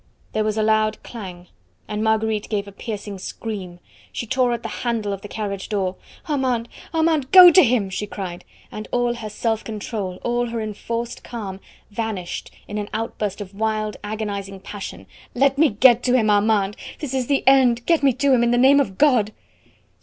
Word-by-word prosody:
There 215 - 0
was 215 0 -1
a 215 - +2
loud 215 0 +1
clang, 185 -6 -9 0.4
and 210 0 -3
Marguerite 220 -1 0
gave 205 -2 -2
a - - -9
piercing 205 -1 -6
scream. 185 -4 -6 0.3
She - - -4
tore 250 +2 +1
at 235 -1 -3
the - - -5
handle 225 -4 -1
of 195 - -6
the 205 - -8
carriage 200 -3 -5
door. 195 -3 -1 0.3
"Armand, 260 -6 0 0.2
Armand, 320 -4 +1
go 365 -2 +11
to 370 +2 +7
him!" 225 -6 +1
she 210 +3 -3
cried; 185 -4 -6 0.3
and 215 0 -7
all 245 -1 +1
her 225 -3 -6
self 220 +1 -1
control, 210 -4 -5
all 240 0 0
her 230 0 -3
enforced 230 +2 -4
calm, 200 -5 -6 0.3
vanished 205 -5 -4 0.2
in 210 0 -4
an 205 - -5
outburst 215 -2 -3
of 200 -1 -8
wild, 215 0 -1
agonising 200 -2 -4
passion. 195 - -8 0.3
"Let 275 +2 +2
me 315 -1 +6
get 240 +2 +5
to 250 0 +3
him, 215 -3 +3
Armand! 205 -1 +2 0.2
This 295 -4 -5
is 260 -2 -1
the 280 -1 +1
end; 255 -3 +4
get 335 -2 +3
me 275 -1 +5
to 270 +2 +2
him, 245 - +4
in 240 - +3
the 240 - +2
name 270 +3 +6
of 195 -9 -1
God!" 250 -8 +4
220 Hz, 190 wpm, -22 LUFS, 205-245 Hz, 0.4 s, go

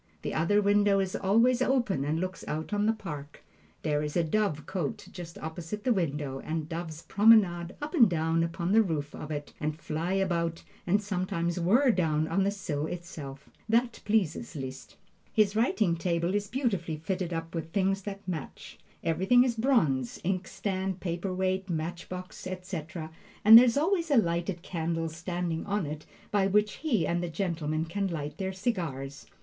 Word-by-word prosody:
The - - -3
other 205 +6 +2
window 205 0 +4
is 190 -1 -1
always 230 +6 +3
open 245 - +1
and 155 +3 0
looks 185 0 -4
out 155 +6 -3
on 205 +1 +2
the - - +5
park. 150 -10 -7 0.4
There 150 -2 +1
is 150 +2 -2
a 170 - +3
dovecote 165 -3 -2
just 170 -2 -8
opposite 165 +6 -6
the 250 - +3
window, 145 -7 -2
and 155 +1 -3
doves 165 -1 -5
promenade 195 -5 +4
up 300 - -4
and 235 - +6
down 165 -1 +1
upon 170 +2 -1
the 225 +2 +6
roof 155 -7 -2
of 150 - -7
it, 145 -2 -5
and 155 +1 -2
fly 165 +3 -2
about, 170 -4 0 0.2
and 205 +4 +3
sometimes 180 -3 -1
whirr 235 +10 +4
down 160 -5 +1
on 195 - +1
the 195 - +2
sill 160 -7 -3
itself. 150 -6 -7 0.2
That 235 +1 +2
pleases 190 - 0
Liszt. 130 -2 -7 0.4
His 210 -2 +3
writing 215 -6 +2
table 170 +1 0
is 205 0 0
beautifully 195 - -1
fitted 180 +2 -3
up 165 0 -4
with 165 -1 -4
things 195 +1 +1
that 200 0 -7
match. 165 -6 -6 0.2
Everything 190 +10 +4
is 245 -2 0
in 225 - -3
bronze 155 - +2
inkstand, 190 +1 -2
paper 175 +1 -3
weight, 190 +1 -1
match 170 +1 -3
box, 185 0 -7
etc. 175 -3 -5 0.3
and 220 +1 +11
there 240 +2 +11
is 235 +1 +2
always 335 +2 +1
a 285 - +4
lighted 170 -2 0
candle 165 -2 -2
standing 165 0 -3
on 200 -3 0
it 150 +1 -6 0.2
by 200 -2 +3
which 210 +2 +2
he 240 - +1
and 175 +2 0
the 175 - -3
gentlemen 160 -3 -1
can 195 +4 -1
light 150 -4 -5
their 190 -1 -1
cigars. 165 - -3
180 Hz, 175 wpm, -29 LUFS, 160-205 Hz, 0.4 s, and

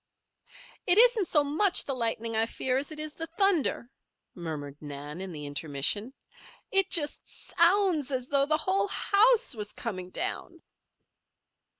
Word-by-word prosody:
"It 360 +1 +5
isn't 465 -5 +6
so 300 -2 +3
much 345 +7 +2
the 275 - -2
lightning 230 -2 -2
I 225 +1 +1
fear 255 +2 -2
as 285 +3 -4
it 305 - -7
is 305 0 -4
the 325 +1 -6
thunder," 350 - +1 0.4
murmured 150 -4 -7
Nan, 145 +3 -8
in 190 -1 -5
the 150 -3 -7
intermission. 145 - -2 0.6
"It 390 -2 +3
just 315 -5 +1
so - - -15
o 385 +4 +5
ounds 295 -5 -3
as 255 -2 -3
though 280 -1 +2
the 305 0 +2
whole 385 +5 0
house 430 +4 +3
was 210 -3 -5
coming 185 -6 -5
down." - - -4
275 Hz, 160 wpm, -28 LUFS, -, 0.6 s, isn't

